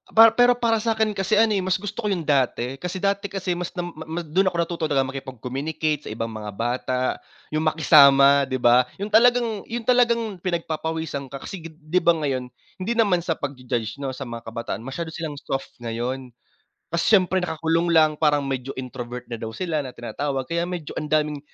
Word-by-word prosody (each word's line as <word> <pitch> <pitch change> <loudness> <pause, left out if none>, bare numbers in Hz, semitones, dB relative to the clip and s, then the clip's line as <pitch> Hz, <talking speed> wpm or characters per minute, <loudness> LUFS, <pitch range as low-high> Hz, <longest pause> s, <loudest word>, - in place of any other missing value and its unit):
Para 225 0 +9
pero 245 +1 +4
para 230 -2 +1
sakin 220 -1 +1
kasi 195 +1 0
ano, 220 +1 +4
eh, 205 - +2
mas 185 0 +1
gusto 205 +2 -5
ko 210 - -1
yung 185 -5 -1
dati. 135 -3 0
Kasi 180 +3 -4
dati 200 +1 0
kasi 190 -1 -3
mas 180 +1 -5
na 175 - -2
ma 160 +2 -6
dun 180 +5 +1
ako 180 - 0
natuto 170 0 -2
talaga 135 -3 +2
makipag-communicate 135 +4 -3
sa - - -5
ibang 115 0 -4
mga 105 -1 -6
bata. 125 +3 -1 0.5
Yung 155 - 0
makisama 140 -3 +6
di 130 - -2
ba? 125 0 +4 0.2
Yung 210 - -5
talagang 230 -1 +3
yung 235 +1 -4
talagang 235 -4 +2
pinagpapawisan 160 -4 -3
ka 135 +1 -9
kasi 195 - -6
di 160 +2 -2
ba 170 -1 +4
ngayon 130 -3 -1 0.3
hindi 205 +6 -1
naman 205 -6 +3
sa 165 -1 -2
pagju-judge 125 -4 -4
no 135 -2 -4
sa 135 - -6
mga 115 -2 -8
kabataan 115 +1 -4
masyado 145 +7 -5
silang 160 -3 -5
soft 135 0 -4
ngayon. 120 +2 -4 0.6
Kasi 170 +6 +4
siyempre 185 -1 +2
nakakulong 165 +1 0
lang, 155 -2 +5
parang 150 -2 +3
medyo 135 0 -3
introvert 125 -1 -7
na - - -2
daw 110 0 -6
sila 165 +1 -2
na 130 - -7
tinatawag. 135 +4 -3
Kaya 170 0 -1
medyo 175 -4 -5
ang 155 - -5
daming 150 -1 +1
155 Hz, 190 wpm, -23 LUFS, 130-185 Hz, 0.6 s, Para